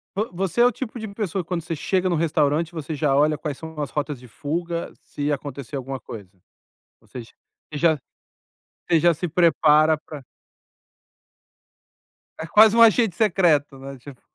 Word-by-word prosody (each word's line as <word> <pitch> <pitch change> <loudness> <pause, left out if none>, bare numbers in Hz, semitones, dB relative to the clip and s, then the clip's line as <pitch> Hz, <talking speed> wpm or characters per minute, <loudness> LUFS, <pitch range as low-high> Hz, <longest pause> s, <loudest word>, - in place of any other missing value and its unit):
Vo 210 +4 -2
você 190 +4 -3
é 240 - +7
o 245 - +4
tipo 240 0 -7
de 220 - -6
pessoa 200 -3 -3
que - - -28
quando 180 -2 -2
você 165 +1 -5
chega 185 +4 0
no 175 - +1
restaurante 160 +1 0
você 160 -1 -5
já 145 -2 +1
olha 150 +2 +3
quais 150 -2 -5
são 160 -1 -9
as 145 - -3
rotas 145 -2 -3
de 125 - -14
fuga, 170 +7 -4
se 145 +1 -4
acontecer 140 -1 -5
alguma 135 0 -5
coisa? 105 -4 -10 0.7
Ou - - -26
seja, 120 -3 -10 0.4
você 150 - -6
já 160 -1 +3 0.9
você 165 - +4
já 170 +2 +4
se 165 +2 -4
prepara 155 -2 +4
para 150 -2 -11 2.2
É 160 - -4
quase 215 +5 +6
um 230 - +5
agente 225 -4 +5
secreto, 170 -10 +2
né, 135 +1 -9
tipo 130 +1 -13
160 Hz, 175 wpm, -23 LUFS, 145-180 Hz, 2.2 s, é